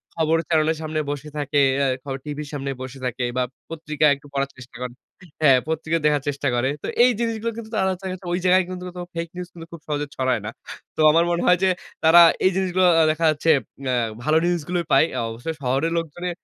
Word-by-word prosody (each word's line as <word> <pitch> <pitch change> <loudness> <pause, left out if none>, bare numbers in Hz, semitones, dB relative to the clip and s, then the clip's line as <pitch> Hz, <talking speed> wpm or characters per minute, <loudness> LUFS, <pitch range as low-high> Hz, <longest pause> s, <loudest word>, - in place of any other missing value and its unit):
খবর 160 0 +2
চ্যানেলের 160 -1 +2
সামনে 155 0 -2
বসে 145 +1 -5
থাকে, 145 0 0 0.2
এ - - +3 0.2
খ - - -56 0.2
টিভির 150 -1 -5
সামনে 140 -1 -3
বসে 130 +1 -7
থাকে 125 0 -2
বা 125 - +2 0.3
পত্রিকায় 155 -2 +1
একটু 145 +1 -16
পড়ার 140 0 -1
চেষ্টা 125 -2 -12
করে। 125 -1 -4 0.5
হ্যাঁ, 135 -4 +6
পত্রিকা 160 +1 -1
দেখার 145 -2 +2
চেষ্টা 145 0 -1
করে। 125 +3 +1
তো - - -3 0.2
এই 250 - +6
জিনিসগুলো 230 0 -1
কিন্তু 220 -1 -8
আ - - -4
তারা 190 - +2
দেখা 190 - -4
যাচ্ছে 185 -1 -9
ওই 175 - 0
জায়গায় 185 +1 +5
কিন্তু 180 0 -6
মূলত 180 - -10 0.2
ফেইক 170 0 -3
নিউজ 180 0 -5
কিন্তু 165 -1 -10
খুব 165 - -9
সহজে 145 -1 -1
ছড়ায় 130 -4 0
না। - - -3 0.5
তো - - -14
আমার 165 +2 +4
মনে 170 - 0
হয় 180 0 +6
যে 190 - +4 0.3
তারা 165 +2 +8 0.2
এই 185 - +5
জিনিসগুলো 185 -1 +1 0.2
আ - - +5
দেখা 160 +1 -1
যাচ্ছে 155 +2 +2 0.3
অ্যা 130 -1 +1 0.3
ভালো 155 +1 +3
নিউজ 175 -1 +1
গুলোই 175 -2 -1
পায়। 135 +4 +6 0.2
অবশ্যই 120 +8 -5
শহরের 135 +5 0
লোকজনে 175 +3 -5
155 Hz, 220 wpm, -23 LUFS, 140-175 Hz, 0.5 s, তারা